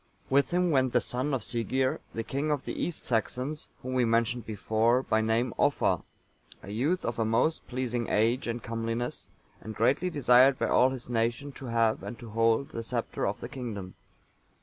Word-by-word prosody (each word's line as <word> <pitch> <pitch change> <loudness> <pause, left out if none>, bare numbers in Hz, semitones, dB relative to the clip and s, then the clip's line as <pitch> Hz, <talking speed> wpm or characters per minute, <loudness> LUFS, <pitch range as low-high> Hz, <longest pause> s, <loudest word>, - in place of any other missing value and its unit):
With 140 +1 +4
him 180 0 +2
went 130 -3 +2
the - - +5
son 130 +4 -2
of 135 -4 0
Sighere,(887) 130 +3 0 0.2
the 115 - -2
king 140 +6 -2
of 145 -3 -1
the - - -3
East 175 - -4
Saxons 125 +6 -1 0.2
whom 130 0 -4
we 130 -1 +3
mentioned 115 +1 +1
before, 110 +4 +1
by 110 -3 +1
name 115 +2 +1
Offa, - - +2 0.6
a 100 - -8
youth 145 - 0
of 120 - -2
a - - +3
most 115 +9 +1
pleasing 125 -2 -2
age 115 +5 +2
and 115 -1 -3
comeliness, 115 +1 -3 0.3
and 110 -1 -7
greatly 130 - +2
desired 130 -3 +5
by - - 0
all 130 - +5
his 130 -2 -6
nation 120 +4 -1
to 135 -1 -9
have 115 -1 +2
and 120 - -7
to 115 -3 -10
hold 115 +4 +2
the 115 - -5
sceptre 115 0 -2
of 100 - -3
the - - -4
kingdom. 110 -9 -6
120 Hz, 190 wpm, -29 LUFS, 115-130 Hz, 0.6 s, the